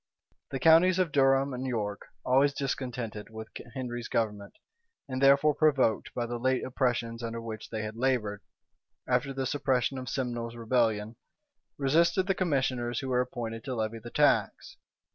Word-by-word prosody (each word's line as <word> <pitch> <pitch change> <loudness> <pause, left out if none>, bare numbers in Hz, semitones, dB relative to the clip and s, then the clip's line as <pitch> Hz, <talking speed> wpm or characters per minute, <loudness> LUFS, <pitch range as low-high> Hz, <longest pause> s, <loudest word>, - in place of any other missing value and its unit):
The 135 - -3
counties 165 +5 +6
of 185 -4 +1
Durham 135 0 +3
and 125 +1 -4
York, 105 -5 -3 0.2
always 140 +3 +3
discontented 125 -6 -4
with 110 0 -8 0.3
Henry's 120 -2 -4
government, 105 -3 -2 0.5
and 130 -1 -4
further 140 +2 +5
provoked 135 -8 +2
by 120 - -1
the 120 0 -4
late 130 +1 +1
oppressions 120 -3 -1
under 115 0 -4
which 110 -1 -7
they 110 -1 -4
had 110 0 -5
labored, 115 -5 0 0.7
after 125 +2 +1
the 135 0 -3
suppression 135 -1 0
of 130 0 -6
Simnel's 120 -3 -3
rebellion, 115 -2 0 0.6
resisted 170 +7 +3
the 195 - +2
commissioners 130 -9 0
who 135 - -4
were 125 -1 +2
appointed 115 -3 -5
to 130 - -3
levy 110 0 -2
the 120 +2 -9
tax. - - +1
125 Hz, 155 wpm, -29 LUFS, 115-135 Hz, 0.7 s, counties